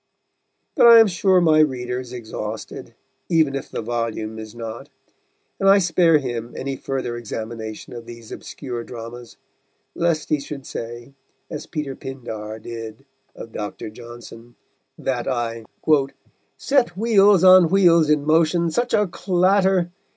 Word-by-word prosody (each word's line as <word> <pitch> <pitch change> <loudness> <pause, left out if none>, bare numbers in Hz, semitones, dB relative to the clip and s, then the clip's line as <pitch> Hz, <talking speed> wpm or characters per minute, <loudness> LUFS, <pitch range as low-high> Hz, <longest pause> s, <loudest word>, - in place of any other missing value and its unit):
But - - +6
I 230 -1 +10
am 225 - +8
sure 190 -1 +3
my 155 -2 +4
reader 125 -4 0
is 125 -1 -9
exhausted, 110 -3 -7 0.3
even 160 -5 +3
if 135 - -5
the - - -5
volume 110 -1 -3
is 110 0 -9
not, 115 -1 -7 0.7
and 195 - +4
I 200 - +7
spare 170 -3 +4
him 120 -4 -5
any 135 0 -3
further 130 -3 -4
examination 110 -1 -7
of 120 -1 -9
these 115 -1 -11
obscure 120 -4 -7
dramas, 120 0 -10 0.6
lest 170 -3 -1
he 150 - +2
should 140 -1 -8
say, 120 +3 -7 0.4
as 150 - -6
Peter 150 -4 -4
Pindar 110 -5 -7
did 115 +2 -9 0.3
of 115 - -10
Dr. 105 0 -6
Johnson, 120 0 -12 0.4
that 125 -3 -2
I 115 -3 -2 0.9
_Set 255 -10 +1
wheels 205 -4 +4
on 185 -2 +8
wheels 170 -4 +4
in 150 -1 +2
motion 165 +2 +2
such 240 +8 0
a 210 - +3
clatter! 185 0 +1
135 Hz, 140 wpm, -22 LUFS, 115-170 Hz, 0.9 s, I